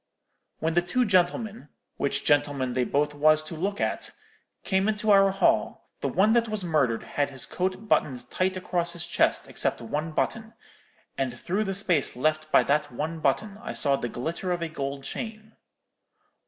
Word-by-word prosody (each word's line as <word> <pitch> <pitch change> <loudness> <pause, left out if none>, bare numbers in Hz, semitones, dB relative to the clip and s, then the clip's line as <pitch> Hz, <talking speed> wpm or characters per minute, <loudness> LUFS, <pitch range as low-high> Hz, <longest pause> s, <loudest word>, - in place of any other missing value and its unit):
When 160 +1 -1
the 175 - +4
two 250 +8 +1
gentlemen—which 180 -7 -1
gentlemen 140 -3 +2
they 125 0 +1
both 145 +3 0
was 155 +1 +4
to 155 - -7
look 195 +6 -2
at—came 190 +1 -3
into 215 0 +1
our 195 -1 +6
hall, 195 0 +1
the - - -1
one 210 +4 +3
that 235 -1 +3
was 215 -2 -1
murdered 140 -9 +1
had 145 -1 -1
his 135 -3 -3
coat 185 +8 -3
buttoned 125 -10 +1
tight 185 0 0
across 175 -2 -1
his 170 - -4
chest, - - +1
except - - -1
one 150 +8 -3
button; 225 +7 -2 0.6
and 135 -2 0
through 185 - -2
the 195 -1 -2
space 180 -7 +1
left 155 +4 0
by - - +6
that 145 +1 +1
one 160 +6 -4
button 200 +9 0
I - - -5
saw 140 -1 +2
the 120 -3 -3
glitter 165 +10 -3
of 175 -1 -1
a 165 - -3
gold 140 -3 -4
chain.' 220 - -6
165 Hz, 170 wpm, -26 LUFS, 145-195 Hz, 0.6 s, our